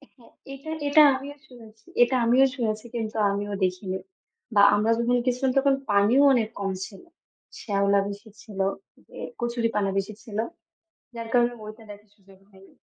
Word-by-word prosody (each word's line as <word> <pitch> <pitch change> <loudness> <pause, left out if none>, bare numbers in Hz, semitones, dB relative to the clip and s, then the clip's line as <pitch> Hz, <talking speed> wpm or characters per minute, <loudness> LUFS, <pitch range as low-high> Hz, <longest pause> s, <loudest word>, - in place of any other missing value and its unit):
হ্যাঁ, 240 - -21 0.2
এটা 275 +4 -8 0.2
এটা 305 +2 +7
আমিও 280 +2 -7
শুনেছি 225 -3 -16 0.2
এটা 250 +2 0
আমিও 250 +3 +5
শুনেছি 220 -3 -2
কিন্তু 220 -2 -4 0.2
আমিও 205 +1 -3
দেখিনি। 185 +1 -1 0.6
বা 200 - +6
আমরা 215 +2 +1
যখন 235 +1 +1
গেছিলাম 255 +1 +1
তখন 275 0 +4 0.2
পানিও 205 +7 +4
অনেক 225 -4 +1
কম 195 -1 -2
ছিল। 200 -2 -13 0.6
শ্যাওলা 200 -1 +2
বেশি 205 +2 -9
ছিল, 205 -3 -10 0.5
যে - - -12 0.2
কচুরিপানা 230 -4 -1
বেশি 195 +2 -2
ছিল। 215 -4 -8 0.8
যার 230 -1 -6
কারণে 240 0 +3
ওইটা 215 +2 -10
দেখার 205 0 -12
সুযোগ 195 -1 -20
হয়নি। 195 -1 -19
220 Hz, 155 wpm, -25 LUFS, 200-245 Hz, 0.8 s, এটা